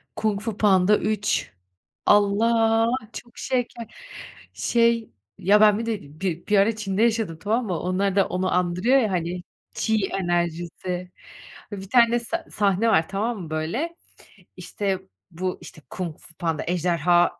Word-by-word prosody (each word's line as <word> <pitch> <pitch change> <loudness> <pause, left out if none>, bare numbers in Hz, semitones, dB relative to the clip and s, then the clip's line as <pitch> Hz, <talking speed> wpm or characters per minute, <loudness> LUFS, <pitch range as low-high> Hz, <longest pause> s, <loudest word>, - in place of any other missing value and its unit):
Kung 215 -2 0
Fu 220 -1 -4
Panda 200 0 +4
3 210 - -1 0.5
Allah! 225 +2 +3 0.2
Çok 240 -1 -10
şeker. 245 -3 -3 0.6
Şey 230 -1 +1 0.3
ya, 205 +3 +4
ben 210 0 +6
bir 230 - -3
de 220 -3 -2 0.2
bir 175 -3 -3
bir 210 -1 +3
ara 210 +3 +3
Çin'de 205 -1 -2
yaşadım 220 -8 0
tamam 220 +6 0
mı? 180 -4 -2
Onlar 190 +2 0
da 195 - +3
onu 185 0 -1
andırıyor 180 +9 +2
ya 220 -5 0
hani 175 0 -2 0.3
气 220 -3 +1
enerjisi. 175 +1 -2 0.6
Bir 195 -1 -7
tane 235 0 +4
sa 235 - -4
sahne 205 +2 +2
var 165 -7 +3
tamam 215 +3 -2
mı 160 - -9
böyle? 200 - -2 0.6
İşte 195 -2 -2 0.3
bu 185 +2 -3
işte 155 - -12
Kung 170 -4 -5
Fu 165 - -16
Panda 165 -3 -2
ejderha 175 0 +2
200 Hz, 145 wpm, -24 LUFS, 180-225 Hz, 0.6 s, ben